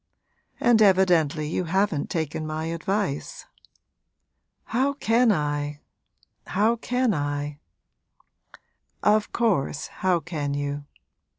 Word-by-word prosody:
'And 235 -2 +4
evidently 175 -6 +4
you 175 +3 -2
haven't 190 -3 0
taken 155 -1 -3
my 155 +1 -3
advice.' 185 -2 -3 1.2
'How 265 +5 0
can 235 -3 +3
I 145 -3 -2 0.7
how 215 +5 +2
can 250 0 0
I?' 145 -1 -3 1.4
'Of 210 0 +3
course, 190 - 0 0.2
how 185 -2 +3
can 150 -4 -3
you? 145 0 -3
170 Hz, 95 wpm, -25 LUFS, 145-210 Hz, 1.4 s, And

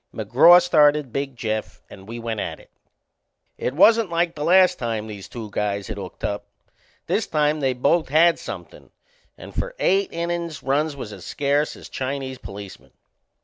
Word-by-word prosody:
McGraw 125 - +6
started 150 -6 +3
Big 140 -1 -3
Jeff 110 -2 -4
and 95 - -13
we 115 +2 -7
went 115 -2 -4
at - - -4
it. - - -20 0.9
It 130 - -2
wasn't 225 +4 +5
like 170 0 0
the 150 - -5
last 180 +1 +5
time 115 -3 -2
these 105 -3 -9
two 110 -4 -8
guys 100 -1 -2
had - - -5
hooked 95 -2 -9
up. 100 0 -3 0.6
This - - 0
time 150 0 +1
they 135 -2 +1
both 140 +6 +1
had 165 +4 +4
somethin', - - -9 0.5
and - - -11
for - - -4
eight 195 +1 +1
innin's 170 -2 -3
runs 145 +2 0
was 110 -6 -7
as 95 -3 -11
scarce 145 - 0
as - - -11
Chinese 130 -1 -4
policemen. 100 -10 -10
140 Hz, 170 wpm, -23 LUFS, 110-165 Hz, 0.9 s, McGraw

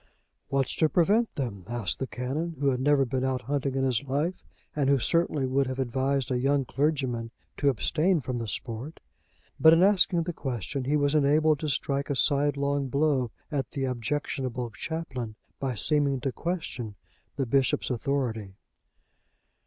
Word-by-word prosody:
"What's 135 -2 0
to 160 - +3
prevent 205 +8 +2
them?" 115 -9 -4
asked 120 -5 -2
the 135 - -2
Canon, 145 +8 -3
who 140 -1 +3
had 125 - -1
never 140 0 +3
been 130 +1 -2
out 130 -1 -1
hunting 140 +1 -1
in 135 - +1
his 130 -3 +1
life, 145 +7 -2 0.3
and 140 -2 +1
who 140 - +5
certainly 150 +1 +1
would 135 +1 +1
have 130 0 -3
advised 135 +1 0
a 125 - +1
young 135 +1 +2
clergyman 130 -5 -1 0.3
to 140 - +3
abstain 155 - +2
from 125 -3 -3
the 115 - -4
sport. 115 - -5 0.6
But 160 0 +8
in 165 +2 +5
asking 190 -3 +4
the 175 +1 -3
question, 130 - -3
he 145 +3 +2
was 145 0 +2
enabled 150 +1 +4
to 155 - -2
strike 140 0 -1
a 140 - 0
sidelong 140 0 +1
blow 140 -2 +1 0.2
at 135 -5 -1
the 135 - -2
objectionable 125 -1 -2
chaplain, 130 -6 -5 0.2
by 130 -3 -2
seeming 140 +2 +1
to 135 - -1
question 130 - -4 0.4
the 135 - -1
bishop's 135 +2 +1
authority. 115 -6 -2
135 Hz, 165 wpm, -28 LUFS, 125-150 Hz, 0.6 s, But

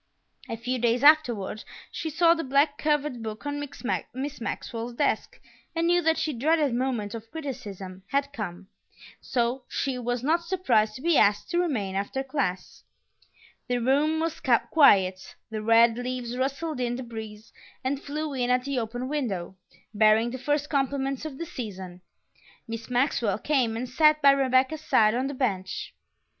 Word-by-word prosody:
A 230 - -3
few 250 +2 -2
days 240 +2 +1
afterward 245 -9 +4 0.3
she 320 - -4
saw 335 +2 +4
the 330 -1 -3
black 280 +2 +2
covered 295 -5 0
book 220 +3 -6
on 290 0 -2 0.5
Miss 270 +1 -5
Maxwell's 230 +1 -4
desk - - -1 0.4
and 330 0 +1
knew 350 +1 +3
that 325 -1 +2
the 305 - -1
dreaded 295 +2 +2
moment 240 -5 -1
of 225 -1 -8
criticism 200 - -7
had 280 +4 -1
come, 195 -6 -6 0.5
so 250 0 -1
she 265 -2 -2
was 245 0 -2
not 330 +5 +2
surprised 260 - +1
to 255 - -9
be 335 -2 +4
asked 205 +9 +2
to 345 - +2
remain 235 - -1
after 200 +8 -2
class. 260 -10 -3 0.8
The 245 - 0
room 285 +6 +2
was 325 0 -2
quiet; 195 - +3 0.2
the 215 -1 -3
red 230 +1 +4
leaves 245 -1 -4
rustled 275 +3 -2
in 245 -1 -1
the 260 - -5
breeze 220 -2 -9 0.3
and 270 +2 -1
flew 300 +1 -4
in 250 -2 -1
at 250 0 +2
the 275 -1 -1
open 245 +2 -4
window, 215 -12 -3 0.4
bearing 215 +2 +4
the 260 - -6
first 290 +2 0
compliments 275 -1 -1
of 290 -4 -6
the 335 - -4
season. 190 - -7 0.7
Miss 230 +1 -6
Maxwell 245 -5 +1
came 245 -4 0
and 250 +2 -3
sat 305 +4 +4
by 280 -2 +7
Rebecca's 270 +2 +2
side 215 -8 +3
on 255 +3 0
the 280 - -5
bench. 195 -8 -2
255 Hz, 165 wpm, -26 LUFS, 225-290 Hz, 0.8 s, by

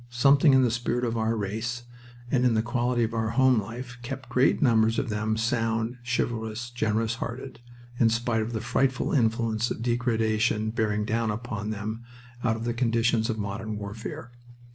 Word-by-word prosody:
Something 140 +4 +5
in 130 - +5
the 120 - +2
spirit 120 +1 -1
of 115 -1 -1
our 115 0 0
race 110 +4 -3 0.5
and 125 -2 +2
in 125 -3 +3
the 110 - +2
quality 120 0 0
of 115 0 -1
our 110 -1 0
home 130 -1 +4
life 125 +4 -8
kept 130 +1 -6
great 125 +2 +3
numbers 115 -4 +3
of 130 - -1
them 110 +1 -1
sound, 115 0 0
chivalrous, 120 -1 -2
generous 110 -1 0
hearted, 130 +3 -6 0.4
in 115 - +5
spite 115 0 0
of 110 +2 -3
the 110 - -2
frightful 130 +2 0
influences 115 -2 +1
of 115 - -6
degradation 110 -3 +1
bearing 105 -2 0
down 115 +1 0
upon 105 -1 -4
them 110 +2 -4 0.4
out 110 -2 +2
of 115 - -5
the 120 0 -1
conditions 115 -1 +1
of 110 - -1
modern 105 +1 -4
warfare. 105 +3 -7
115 Hz, 175 wpm, -27 LUFS, 110-120 Hz, 0.5 s, Something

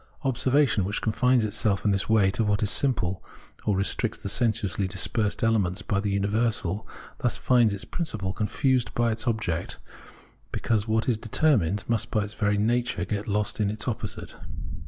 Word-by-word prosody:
Observation, 130 -3 +2
which 100 +3 -2
confines 125 +1 +2
itself 105 -2 -1
in 105 - +4
this 95 +2 -1
way 105 -3 +4
to 115 - 0
what 105 +1 +1
is 100 - +3
simple, 95 -10 +1 0.4
or 105 - +2
restricts 105 +3 +1
the 100 - -5
sensuously 105 -3 +1
dispersed 100 +3 0
elements 100 -5 +1
by 100 - 0
the 100 -1 0
imiversal, 105 -1 0 0.3
thus 120 - 0
finds 120 -4 +3
its 100 +2 -5
principle 110 - -4
confused 125 +4 0
by 120 -1 +2
its 110 +3 -4
object, 100 -8 -2 0.7
because 110 -2 -1
what 110 0 0
is 115 -4 +1
determined 105 - +1
must 115 -2 -1
by 110 - 0
its 105 +1 -5
very 105 -2 0
nature 120 +4 0
get 105 -1 -3
lost 105 +1 -1
in 105 -2 +1
its 110 +4 -3
opposite. 115 -4 -4
110 Hz, 170 wpm, -26 LUFS, 100-115 Hz, 0.7 s, in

